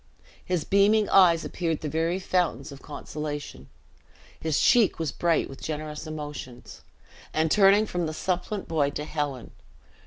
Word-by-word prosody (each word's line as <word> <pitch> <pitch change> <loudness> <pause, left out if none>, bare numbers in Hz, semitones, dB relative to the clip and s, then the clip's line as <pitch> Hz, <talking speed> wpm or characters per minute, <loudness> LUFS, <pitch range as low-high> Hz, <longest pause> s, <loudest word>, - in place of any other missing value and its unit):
His 180 -4 -1
beaming 205 +2 +3
eyes 170 -4 +5
appeared 165 -3 -2
the 155 - -3
very 165 +4 0
fountains 175 -6 -1
of 140 - -11
consolation; 145 - -7 0.7
his 160 -2 0
cheek 240 -5 +4
was 160 -4 -2
bright 170 -2 +1
with 135 - -11
generous 155 0 -5
emotions; 145 -5 -8 0.5
and 160 0 +1
turning 200 +2 +5
from 175 -5 -2
the - - -3
supplant 185 +3 -2
boy 150 -4 +1
to 150 +1 -5
Helen. 145 -5 -4
160 Hz, 145 wpm, -26 LUFS, 150-180 Hz, 0.7 s, eyes